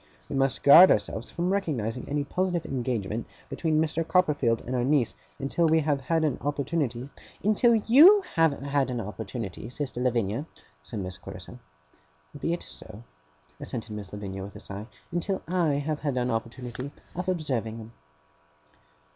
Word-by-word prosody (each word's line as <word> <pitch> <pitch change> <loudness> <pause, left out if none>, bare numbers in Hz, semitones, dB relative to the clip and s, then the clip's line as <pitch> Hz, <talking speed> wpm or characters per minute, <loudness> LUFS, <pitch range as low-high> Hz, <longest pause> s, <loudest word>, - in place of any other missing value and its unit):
We - - -3
must 135 -1 +1
guard 165 +6 +10
ourselves - - 0
from 180 +2 -1
recognizing 125 - -2
any 145 0 0
positive 180 +2 -1
engagement 120 -4 -2 0.2
between 155 -2 0
Mr. 160 +1 +1
Copperfield 150 -10 +2
and 130 - -3
our 125 - +1
niece, 135 -2 +2 0.2
until 145 +4 +1
we 160 0 +4
have 145 -2 0
had 160 +5 +1
an 150 -5 0
opportunity 140 -3 -2 0.2
' - - -24
'Until 215 +3 +4
YOU 305 - +7
have 165 -2 +4
had 140 -1 -1
an 125 -2 -2
opportunity, 110 0 -6
sister 130 -1 -4
Lavinia,' 120 +2 0 0.3
said 100 +8 -6
Miss 90 -1 -5
Clarissa. - - -10 0.8
'Be 155 +3 -2
it 170 - -2
so,' 110 +4 -11 0.6
assented 115 -3 -5
Miss 105 -2 -7
Lavinia, 100 -2 -6
with 100 +1 -8
a - - -8
sigh 100 +2 -8 0.2
'until 175 +3 -2
I 170 -4 +1
have 145 +1 -2
had 140 -4 -2
an 125 0 0
opportunity 120 +3 -4 0.3
of 180 +2 -3
observing 130 -11 -2
them. 110 0 -10
140 Hz, 160 wpm, -27 LUFS, 115-165 Hz, 0.8 s, guard